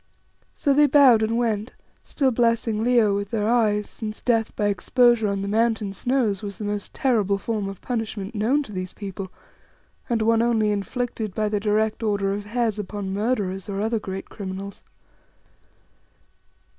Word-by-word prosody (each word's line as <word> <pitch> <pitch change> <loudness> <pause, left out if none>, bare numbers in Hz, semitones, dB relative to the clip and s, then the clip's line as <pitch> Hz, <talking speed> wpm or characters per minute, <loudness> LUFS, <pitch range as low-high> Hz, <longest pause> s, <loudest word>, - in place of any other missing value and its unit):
So 280 - +2
they 295 +1 +5
bowed 265 -5 +6
and 220 +1 0
went, 225 -1 -1 0.3
still 270 -3 0
blessing 230 -2 +1
Leo 235 -4 +4
with 200 0 -3
their 210 -2 -1
eyes, 215 -3 +2
since 215 -1 -7
death 225 -3 0
by 210 - 0
exposure 225 +3 +3
on 200 -1 -2
the - - -3
Mountain 220 -1 +1
snows 230 -3 0
was 200 -2 -6
the - - -6
most 205 0 -3
terrible 215 -8 +1
form 205 -1 -3
of 195 - -9
punishment 225 -3 -4
known 240 +8 +1
to 240 - -11
these 185 -2 -5
people, 195 -2 -6 0.8
and 230 -2 +1
one 225 0 +3
only 225 -3 +2
inflicted 215 0 -3
by 215 -1 0
the 210 -1 0
direct 215 +1 0
order 200 -3 0
of 205 0 -5
Hes 225 -1 -1
upon 200 -1 -4
murderers 200 -3 -1
or 195 0 -3
other 220 +2 0
great 190 -1 -6
criminals. 195 0 -7
215 Hz, 165 wpm, -24 LUFS, 200-235 Hz, 0.8 s, bowed